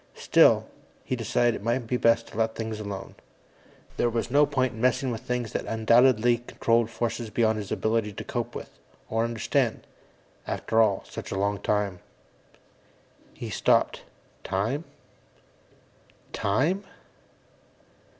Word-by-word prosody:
Still, -, -, +4 dB, 0.4 s
he 130 Hz, -, -1 dB
decided 120 Hz, 0 st, +1 dB
it -, -, -6 dB
might 120 Hz, +2 st, 0 dB
be 125 Hz, -, -1 dB
best 115 Hz, -1 st, +3 dB
to -, -, -14 dB
let 110 Hz, 0 st, 0 dB
things 110 Hz, -1 st, -4 dB
alone. 100 Hz, -2 st, -6 dB, 0.8 s
There 120 Hz, -, +2 dB
was 115 Hz, +1 st, -2 dB
no 145 Hz, +2 st, +5 dB
point 130 Hz, -3 st, 0 dB
in 110 Hz, -, -8 dB
messing 130 Hz, +1 st, +2 dB
with 115 Hz, -1 st, -4 dB
things 125 Hz, -2 st, -3 dB
that -, -, -2 dB
undoubtedly 120 Hz, +1 st, +4 dB
controlled 115 Hz, -1 st, +1 dB
forces 115 Hz, 0 st, -3 dB
beyond 110 Hz, 0 st, +1 dB
his 100 Hz, -2 st, -7 dB
ability 110 Hz, -1 st, 0 dB
to -, -, -6 dB
cope -, -, -4 dB
with, -, -, -7 dB, 0.4 s
or 115 Hz, +1 st, +1 dB
understand. 115 Hz, -2 st, -1 dB, 0.6 s
After 115 Hz, 0 st, +1 dB
all, 105 Hz, -3 st, +2 dB
such -, -, -7 dB
a 95 Hz, -, -2 dB
long 100 Hz, +1 st, 0 dB
time 105 Hz, -3 st, -1 dB, 1.4 s
He -, -, -6 dB
stopped, -, -, +2 dB, 0.4 s
Time? 115 Hz, -, -1 dB, 1.5 s
_Time? 145 Hz, -, +1 dB
115 Hz, 135 wpm, -26 LUFS, 110-120 Hz, 1.5 s, no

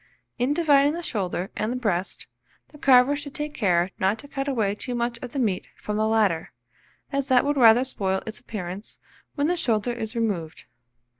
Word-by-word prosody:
In 250 Hz, +3 st, +1 dB
dividing 290 Hz, -3 st, +4 dB
the 345 Hz, +1 st, -5 dB
shoulder 190 Hz, -, -2 dB
and 235 Hz, +4 st, -2 dB
breast, 195 Hz, -6 st, -1 dB, 0.4 s
the 295 Hz, -, -16 dB
carver 265 Hz, 0 st, +5 dB
should 285 Hz, -1 st, -7 dB
take 295 Hz, 0 st, -4 dB
care 180 Hz, -6 st, +1 dB
not 190 Hz, +3 st, +2 dB
to 285 Hz, -, -11 dB
cut 275 Hz, 0 st, -4 dB
away 220 Hz, -7 st, +1 dB
too 245 Hz, +4 st, -5 dB
much 235 Hz, 0 st, -2 dB
of 250 Hz, -, -7 dB
the 280 Hz, -, -6 dB
meat 210 Hz, -8 st, 0 dB
from 210 Hz, -, -5 dB
the 215 Hz, 0 st, +2 dB
latter, 205 Hz, -10 st, +1 dB, 0.6 s
as 275 Hz, -1 st, -1 dB
that 255 Hz, -1 st, +4 dB
would 290 Hz, +1 st, +1 dB
rather 240 Hz, -2 st, +6 dB
spoil 190 Hz, -7 st, -1 dB
its 220 Hz, 0 st, -5 dB
appearance 200 Hz, -4 st, -7 dB, 0.4 s
when 285 Hz, -1 st, 0 dB
the 350 Hz, +3 st, +2 dB
shoulder 235 Hz, -7 st, +1 dB
is 225 Hz, 0 st, -4 dB
removed. 195 Hz, -9 st, -2 dB
235 Hz, 190 wpm, -25 LUFS, 205-275 Hz, 0.6 s, rather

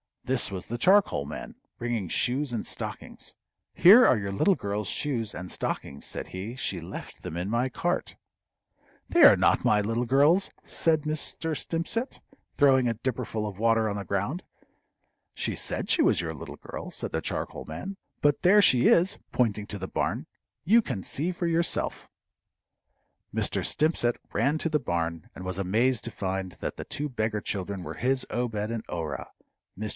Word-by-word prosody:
This 130 Hz, -1 st, +1 dB
was 95 Hz, -3 st, -5 dB
the 120 Hz, -, -3 dB
charcoal 190 Hz, -, +4 dB
man, 75 Hz, -, -7 dB, 0.2 s
bringing 120 Hz, -5 st, -2 dB
shoes 130 Hz, -, 0 dB
and 115 Hz, -, -2 dB
stockings. -, -, -6 dB, 0.4 s
"Here 220 Hz, +8 st, +8 dB
are 125 Hz, -, +5 dB
your 100 Hz, -1 st, -3 dB
little 185 Hz, -, +3 dB
girl's 100 Hz, -, -3 dB
shoes 115 Hz, -7 st, -2 dB
and 90 Hz, 0 st, -6 dB
stockings," 70 Hz, -, -4 dB
said -, -, -4 dB
he. 100 Hz, +6 st, -6 dB
"She 100 Hz, -8 st, -2 dB
left 85 Hz, -, -9 dB
them 80 Hz, -, -6 dB
in 90 Hz, +3 st, -2 dB
my 120 Hz, +4 st, +1 dB
cart." -, -, -2 dB, 0.9 s
"They -, -, +5 dB
are -, -, +10 dB
not -, -, +2 dB
my 105 Hz, -1 st, +4 dB
little 115 Hz, +4 st, -1 dB
girl's," 145 Hz, +10 st, +4 dB
said 160 Hz, -2 st, +1 dB
Mr. 155 Hz, +1 st, -3 dB
Stimpcett, 170 Hz, -, -2 dB, 0.4 s
throwing 135 Hz, -3 st, +5 dB
a 115 Hz, -, 0 dB
dipperful 115 Hz, -2 st, -3 dB
of 100 Hz, -2 st, -8 dB
water 115 Hz, -1 st, +3 dB
on 100 Hz, -, -3 dB
the 100 Hz, -, -5 dB
ground. 100 Hz, -, -2 dB, 0.9 s
"She -, -, -1 dB
said -, -, -2 dB
she -, -, +4 dB
was -, -, +3 dB
your 80 Hz, -1 st, -4 dB
little 75 Hz, -, -8 dB
girl," -, -, -8 dB
said -, -, -4 dB
the -, -, -1 dB
charcoal -, -, -4 dB
man. 140 Hz, -, -6 dB, 0.2 s
"But 145 Hz, -1 st, +3 dB
there 200 Hz, +3 st, +6 dB
she 125 Hz, -10 st, +6 dB
is" 180 Hz, +4 st, +4 dB
pointing 105 Hz, -4 st, 0 dB
to 105 Hz, -, -4 dB
the 95 Hz, -1 st, -5 dB
barn; -, -, -2 dB, 0.4 s
"you 225 Hz, +8 st, +5 dB
can 95 Hz, -, -4 dB
see 165 Hz, +6 st, -1 dB
for 175 Hz, 0 st, -3 dB
yourself." 170 Hz, 0 st, 0 dB, 1.3 s
Mr. -, -, 0 dB
Stimpcett 150 Hz, -6 st, +1 dB, 0.2 s
ran 140 Hz, +8 st, +2 dB
to 165 Hz, -, 0 dB
the 150 Hz, -1 st, +2 dB
barn, 85 Hz, -, -3 dB
and 95 Hz, -, -8 dB
was 95 Hz, -1 st, -1 dB
amazed 115 Hz, +6 st, +1 dB
to 120 Hz, -, -4 dB
find 95 Hz, -2 st, -3 dB
that -, -, -5 dB
the -, -, -6 dB
two 150 Hz, +1 st, -4 dB
beggar 110 Hz, -4 st, -1 dB
children 100 Hz, -2 st, -3 dB
were -, -, -6 dB
his 130 Hz, +1 st, +1 dB
Obed 110 Hz, -3 st, -2 dB
and 115 Hz, -1 st, -3 dB
Orah. 80 Hz, -4 st, -4 dB, 0.5 s
Mr. 105 Hz, +2 st, -4 dB
115 Hz, 175 wpm, -27 LUFS, 100-150 Hz, 1.3 s, are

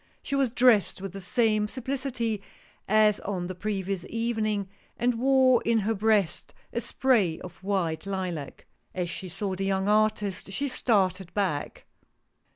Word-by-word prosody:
She -, -, -5 dB
was 270 Hz, -2 st, +2 dB
dressed 240 Hz, -5 st, +4 dB
with 195 Hz, -1 st, -6 dB
the 195 Hz, -, -6 dB
same 215 Hz, +2 st, +2 dB
simplicity 250 Hz, -3 st, -3 dB, 0.5 s
as 215 Hz, 0 st, +4 dB
on 185 Hz, -3 st, -3 dB
the 185 Hz, -, -4 dB
previous 195 Hz, -1 st, -3 dB
evening, 220 Hz, -3 st, -1 dB, 0.3 s
and 240 Hz, 0 st, +1 dB
wore 260 Hz, -1 st, +5 dB
in 230 Hz, 0 st, +2 dB
her 220 Hz, +3 st, 0 dB
breast 210 Hz, -4 st, +1 dB, 0.2 s
a -, -, -1 dB
spray 215 Hz, -11 st, +2 dB
of 180 Hz, -, -10 dB
white 190 Hz, -4 st, -1 dB
lilac. 180 Hz, -7 st, -4 dB, 0.3 s
As 180 Hz, -2 st, -2 dB
she 185 Hz, +2 st, -6 dB
saw 195 Hz, +2 st, -3 dB
the 190 Hz, +1 st, -3 dB
young 195 Hz, 0 st, 0 dB
artist 210 Hz, -2 st, +1 dB
she 280 Hz, +7 st, -2 dB
started 190 Hz, -7 st, +1 dB
back. 185 Hz, -8 st, -2 dB
205 Hz, 150 wpm, -27 LUFS, 190-230 Hz, 0.5 s, wore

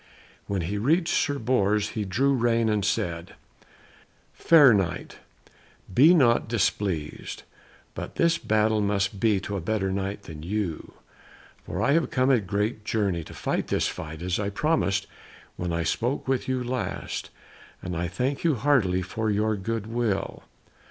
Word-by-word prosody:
When 100 Hz, -2 st, -1 dB
he 100 Hz, +5 st, -2 dB
reached 165 Hz, -, +2 dB
Sir 145 Hz, -2 st, +1 dB
Bors 105 Hz, -4 st, +1 dB
he 110 Hz, -3 st, -3 dB
drew 135 Hz, +9 st, +1 dB
rein 115 Hz, -2 st, +2 dB
and 105 Hz, -2 st, +1 dB
said, 90 Hz, -5 st, -2 dB, 1.0 s
"Fair 145 Hz, -7 st, +6 dB
Knight, 90 Hz, -4 st, -2 dB, 0.7 s
be 155 Hz, -, +7 dB
not 120 Hz, -8 st, +3 dB
displeased, 95 Hz, -7 st, -2 dB, 0.5 s
but -, -, -7 dB
this 170 Hz, 0 st, +2 dB
battle 110 Hz, 0 st, +2 dB
must 100 Hz, -1 st, 0 dB
be 105 Hz, -2 st, +3 dB
to 100 Hz, -, -5 dB
a 95 Hz, -, -2 dB
better 95 Hz, +1 st, -1 dB
Knight 100 Hz, +1 st, -3 dB
than 80 Hz, -2 st, -9 dB
you. 90 Hz, -1 st, -4 dB, 0.7 s
For 100 Hz, -, -2 dB
I 140 Hz, -, +3 dB
have 165 Hz, +2 st, +2 dB
come 130 Hz, +1 st, +2 dB
a 125 Hz, -, +4 dB
great 105 Hz, +3 st, -2 dB
journey 100 Hz, -7 st, -1 dB
to -, -, -11 dB
fight -, -, -2 dB
this -, -, +1 dB
fight, 80 Hz, +1 st, -6 dB
as 90 Hz, +1 st, -1 dB
I 100 Hz, -1 st, -1 dB
promised 105 Hz, -5 st, 0 dB, 0.5 s
when 90 Hz, -1 st, -3 dB
I 85 Hz, 0 st, -1 dB
spoke 125 Hz, -, -1 dB
with 130 Hz, -1 st, 0 dB
you 130 Hz, -1 st, -1 dB
last, 125 Hz, +1 st, -4 dB, 0.5 s
and 90 Hz, -1 st, -4 dB
I 85 Hz, +1 st, -1 dB
thank 125 Hz, +11 st, -2 dB
you 165 Hz, -4 st, +3 dB
heartily 105 Hz, -8 st, +2 dB
for 110 Hz, +4 st, -2 dB
your 105 Hz, +1 st, +1 dB
goodwill." 110 Hz, +1 st, -2 dB
105 Hz, 155 wpm, -26 LUFS, 95-125 Hz, 1.0 s, be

